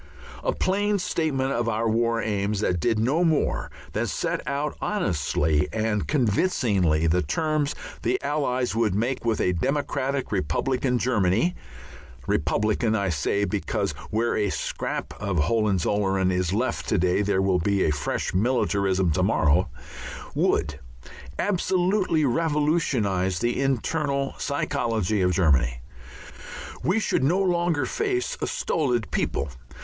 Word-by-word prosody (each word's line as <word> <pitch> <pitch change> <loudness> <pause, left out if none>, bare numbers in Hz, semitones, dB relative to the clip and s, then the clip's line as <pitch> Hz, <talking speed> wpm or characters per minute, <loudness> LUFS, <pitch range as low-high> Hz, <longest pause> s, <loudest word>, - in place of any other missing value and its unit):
A - - +1
plain 205 +2 +1
statement 155 -7 -1
of 120 -2 0
our 115 +1 0
war 115 +1 +1
aims 100 -1 -1
that 90 -4 +1
did 115 +5 +1
no 135 +10 +2
more 160 -3 +1 0.2
than - - 0
set - - -2
out 140 +2 -2
honestly 80 - 0
and 110 -1 -1
convincingly 105 - +2
the 85 +2 +3
terms 155 - 0 0.3
the 120 - 0
Allies 135 -5 0
would 110 -4 +1
make 120 +5 -1
with 115 -2 0
a 90 - +2
democratic 135 - -1
republican 125 - 0
Germany 115 - +2 0.7
republican 110 +7 +1
I 100 -3 0
say, 90 +6 0
because 100 -1 -1 0.2
where 115 +2 0
a 105 -1 +1
scrap - - -3
of 100 -3 -1
Hohenzollern 95 +1 +1
is 90 -1 0
left 115 +6 -1
to - - +2
day 90 +2 +2
there 100 -2 +1
will 95 -2 +2
be 100 +3 +1
a 75 - +2
fresh 75 -1 -2
militarism 100 -4 +1
to - - 0
morrow 75 -1 +2 0.6
would 75 -1 0 0.6
absolutely 185 -3 +1
revolutionize 135 - +1
the 120 +6 0
internal 140 +1 0
psychology 115 -8 -1
of 90 0 +3
Germany. 70 -9 +2 1.0
We 185 +5 +1
should 200 - 0
no 165 +7 +3
longer 175 -4 +1
face 400 +2 -1
a - - 0
solid 140 - -1
people. 70 +1 -1
115 Hz, 130 wpm, -25 LUFS, 95-145 Hz, 1.0 s, the